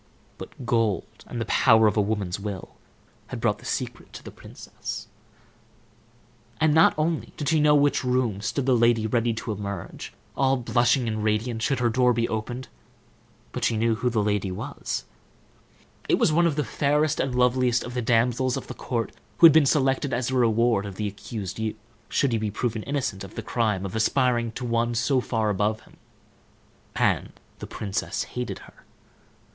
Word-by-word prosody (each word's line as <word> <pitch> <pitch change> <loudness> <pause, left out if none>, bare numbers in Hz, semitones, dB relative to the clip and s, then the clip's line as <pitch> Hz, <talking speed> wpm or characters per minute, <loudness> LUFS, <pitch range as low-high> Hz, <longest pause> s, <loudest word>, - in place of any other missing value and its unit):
But 130 - -9
gold, 115 -6 -1
and 120 - -5
the 115 - -2
power 110 -3 +5
of 105 - +3
a 105 - +3
woman's 100 -3 -2
will, 100 -2 -6 0.5
had - - -6
brought - - 0
the - - -14
secret - - -4
to - - -9
the - - -9
princess. - - -8 1.5
And 155 -1 +3
not 160 +1 +5
only 160 +1 -1
did 145 -2 -2
she 160 - +3
know 150 0 +5
in 145 - +4
which 145 - +1
room 125 -5 0
stood 125 +5 -2
the 130 -1 +4
lady 115 -1 +3
ready 115 +1 +1
to 115 - -4
emerge, 100 -1 -6 0.2
all 135 0 +2
blushing 120 0 +2
and 110 -1 -2
radiant, 110 +2 0
should 135 +4 +1
her 120 -1 +2
door 125 +1 +3
be 115 0 0
opened, 120 +3 -4 0.8
but - - -5
she 115 - +2
knew 115 +1 +2
who 125 +3 0
the 110 -3 0
lady 105 -2 0
was. 90 - -5 1.0
It - - +4
was 155 - +2
one 170 +2 +4
of 155 - 0
the 150 - 0
fairest 150 +1 +1
and 130 -2 -1
loveliest 125 -1 +2
of 125 - -7
the 125 - -1
damsels 120 +2 +1
of - - -6
the - - -7
court 115 -4 -3 0.3
who - - +7
had 160 - +10
been 155 -3 +5
selected 135 -1 +1
as 120 0 -1
the 130 - -1
reward 115 -3 +2
of 100 - -8
the 105 +2 -2
accused 100 -1 -6
youth, 110 -1 -2 0.3
should 140 - +1
he 115 - +1
be 110 -1 -1
proved 110 +1 -2
innocent 135 -9 -2
of 95 - -11
the - - -5
crime 105 -5 0
of 95 - -5
aspiring 120 0 +1
to 125 - -5
one 115 0 0
so 130 +3 +2
far 110 -3 0
above 105 +2 0
him; - - -21 1.0
and - - +1 0.3
the - - -7
princess 100 -2 -3
hated 125 0 -3
her. - - -19
120 Hz, 190 wpm, -25 LUFS, 110-130 Hz, 1.5 s, had